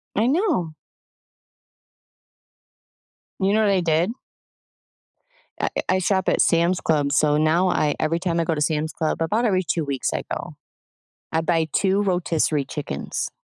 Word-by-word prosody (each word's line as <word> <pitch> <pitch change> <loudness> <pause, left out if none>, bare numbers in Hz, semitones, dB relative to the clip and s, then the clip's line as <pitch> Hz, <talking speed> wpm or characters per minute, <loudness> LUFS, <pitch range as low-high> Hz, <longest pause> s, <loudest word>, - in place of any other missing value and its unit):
I 220 +4 +2
know. 295 - 0 2.7
You 195 +2 +2
know 220 - +3
what 205 -2 +3
I 190 - +3
did? 170 +5 +1 1.5
I - - 0 0.2
I 185 0 +3
shop 190 +2 +1
at - - +2
Sam's 170 +2 +2
Club. 145 -3 +1
So 150 -1 +3
now 165 +4 +2
I 150 -4 +1
every 160 +2 0
time 170 -2 -1
I 165 - +2
go 165 -1 -1
to 150 - -3
Sam's 155 +1 0
Club- 160 0 -2
about 215 +9 +1
every 190 -4 +2
2 165 -1 -1
weeks 140 -2 -2
I - - -2
go- - - -5 0.8
I 160 - +1
buy 165 -1 +1
2 195 +1 +2
rotisserie 165 -6 0
chickens. 140 - -4
165 Hz, 150 wpm, -23 LUFS, 155-190 Hz, 2.7 s, know